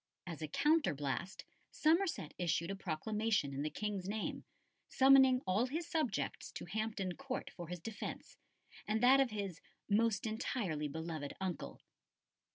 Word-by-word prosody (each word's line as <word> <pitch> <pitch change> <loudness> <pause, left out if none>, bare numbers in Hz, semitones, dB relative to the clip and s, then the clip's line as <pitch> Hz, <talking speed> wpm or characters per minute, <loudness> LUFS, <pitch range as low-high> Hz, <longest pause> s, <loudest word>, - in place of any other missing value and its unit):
As 165 -3 -6
a 155 - -2
counterblast, 185 - +1 0.3
Somerset 320 - +1
issued 170 0 0
a - - -2
proclamation 195 -2 0
in 135 - -2
the 155 - -1
King's 200 0 -3
name, 215 0 -3 0.5
summoning 265 -1 +6
all 200 +7 +2
his 320 +6 -3
subjects 305 -11 -1
to - - -6
Hampton 205 -1 -2
Court 275 -1 -4
for 175 -2 -7
his 180 +1 -5
defence 210 +5 -6 0.5
and 220 +2 0
that 265 +2 +7
of 270 -2 +4
his 200 -6 -4 0.3
"most 220 0 +2
entirely 215 - -1
beloved 160 -1 -4
uncle." 175 - -4
205 Hz, 140 wpm, -36 LUFS, 170-245 Hz, 0.5 s, that